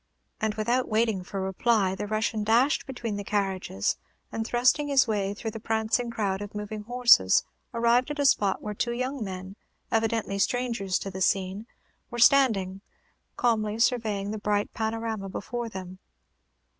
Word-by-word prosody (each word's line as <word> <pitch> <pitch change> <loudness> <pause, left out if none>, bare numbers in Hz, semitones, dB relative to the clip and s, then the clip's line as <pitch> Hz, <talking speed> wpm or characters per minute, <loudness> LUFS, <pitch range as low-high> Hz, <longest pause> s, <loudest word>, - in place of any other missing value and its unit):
And, 215 -1 -1
without 235 +4 0
waiting 220 -3 +1
for 195 +1 -5
reply, 190 +1 +1
the 205 +2 -4
Russian 215 0 -1
dashed 240 +9 +2
between 235 -5 -4
the 205 - -4
carriages, 190 - -1 0.3
and 225 0 -3
thrusting 255 +5 +2
his 275 -2 +4
way 205 -2 -1
through 225 +1 -4
the 225 - -7
prancing 220 +2 0
crowd 205 -4 -2
of 205 0 -7
moving 210 +1 -5
horses, 240 - +5 0.3
arrived 235 +2 +2
at 295 - -4
a 285 - +1
spot 200 -7 +2
where 210 - -3
two 235 +3 -1
young 255 +1 -3
men, 190 0 -7 0.3
evidently 225 -3 0
strangers 230 -4 0
to 195 - -5
the 190 0 -6
scene, 195 +4 0 0.4
were 240 - -6
standing, 220 -7 +4 0.6
calmly 215 -3 +1
surveying 220 -4 +1
the 215 - -4
bright 205 0 0
panorama 220 -2 -3
before 235 +5 -4
them. 185 -3 -8
220 Hz, 155 wpm, -27 LUFS, 195-235 Hz, 0.6 s, horses